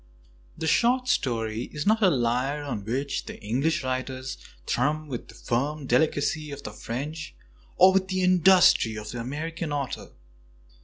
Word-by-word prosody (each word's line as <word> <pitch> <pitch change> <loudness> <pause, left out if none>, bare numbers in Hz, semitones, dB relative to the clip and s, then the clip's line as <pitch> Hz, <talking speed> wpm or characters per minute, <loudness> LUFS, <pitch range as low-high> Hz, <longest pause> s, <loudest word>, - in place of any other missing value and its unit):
The - - -4
short 245 +9 +3
story 115 - 0
is 150 0 -4
not 220 +2 +3
a 195 - +6
lyre 130 +1 0
on 130 -8 -4
which 135 +5 -2 0.2
English 130 +10 0
Preface - - -10
writers 130 0 -3 0.3
thrum 150 +5 0
with 125 -4 -6
the - - -14
firm 140 +5 -2
delicacy 150 +3 +1
of 140 0 -8
the - - -6
French, 145 +9 -6 0.4
or 185 +1 +7
with 190 0 +2
the 185 -1 -1
industry 180 - +5
of 105 0 -6
the 120 - -5
American 155 +6 -4
author. 140 -2 -3
145 Hz, 155 wpm, -26 LUFS, 125-160 Hz, 0.4 s, or